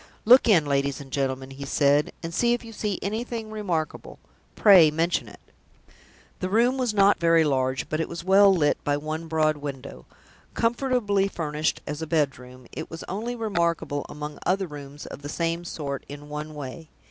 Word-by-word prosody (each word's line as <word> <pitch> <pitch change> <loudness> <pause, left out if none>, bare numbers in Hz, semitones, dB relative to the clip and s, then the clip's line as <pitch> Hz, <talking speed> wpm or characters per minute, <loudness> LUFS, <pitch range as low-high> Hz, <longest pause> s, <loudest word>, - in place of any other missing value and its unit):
"Look 245 +1 +7
in, 170 -8 +5
ladies 140 -1 0
and 135 -2 -11
gentlemen," 135 -1 -2
he 135 +1 -8
said; 145 +1 +2
"and, 165 0 -5
if 240 0 +1
you 225 - -10
see 210 -2 -2
anything 225 +1 -4
remarkable, 180 -8 -3 0.4
pray 185 -7 +7
mention 165 +3 0
it." - - -13 1.0
The 185 - -2
room 240 +6 +2
was 250 -3 +1
not 200 -1 +4
very 165 -1 +4
large, 130 -3 0
but 155 - -2
it 160 - -2
was 170 0 -6
well 195 +2 +6
lit 160 -6 +1
by 145 0 +1
one 155 +2 -5
broad 155 -1 +1
window. 140 -2 -8 0.5
Comfortably 230 -5 +1
furnished 155 -4 -2
as 150 +1 -5
a 160 - -4
bedroom, 130 -5 -2
it - - -7
was 165 - -8
only 225 +6 -3
remarkable 170 -9 -1
among 150 0 -7
other 190 +2 +1
rooms 145 -2 -9
of - - -9
the 145 - -7
same 165 +2 -2
sort 145 -5 -5
in 145 +1 -9
one 150 +1 -6
way. 150 +3 -8
160 Hz, 175 wpm, -25 LUFS, 145-200 Hz, 1.0 s, Look